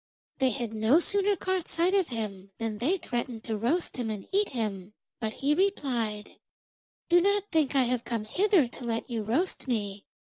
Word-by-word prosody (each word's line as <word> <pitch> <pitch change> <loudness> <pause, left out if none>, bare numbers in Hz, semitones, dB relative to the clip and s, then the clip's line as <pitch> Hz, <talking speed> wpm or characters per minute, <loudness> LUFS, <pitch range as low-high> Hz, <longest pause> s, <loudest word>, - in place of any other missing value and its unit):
They 265 -1 +4
had 235 -1 -3
no 220 +8 +4
sooner 400 +3 +2
caught 375 -1 -2
sight 345 +3 +2
of 385 -4 +3
him 205 -5 -5
than 225 -2 -3
they 320 - +2
threatened 240 -6 -4
to 220 - -2
roast 255 - 0
him 240 -3 -2
and 210 -3 -5
eat 405 +1 +2
him, 210 -5 -3 0.3
but 220 -3 -2
he 285 +3 +1
replied: 250 - -1 0.7
'Do 350 0 +6
not 405 +2 +3
think 310 -5 +2
I 265 - +5
have 245 -1 0
come 230 -3 -3
hither 380 - +3
to 245 - -11
let 230 -1 -2
you 230 -2 -1
roast 265 - -1
me. 205 -5 -2
245 Hz, 190 wpm, -28 LUFS, 220-345 Hz, 0.7 s, Do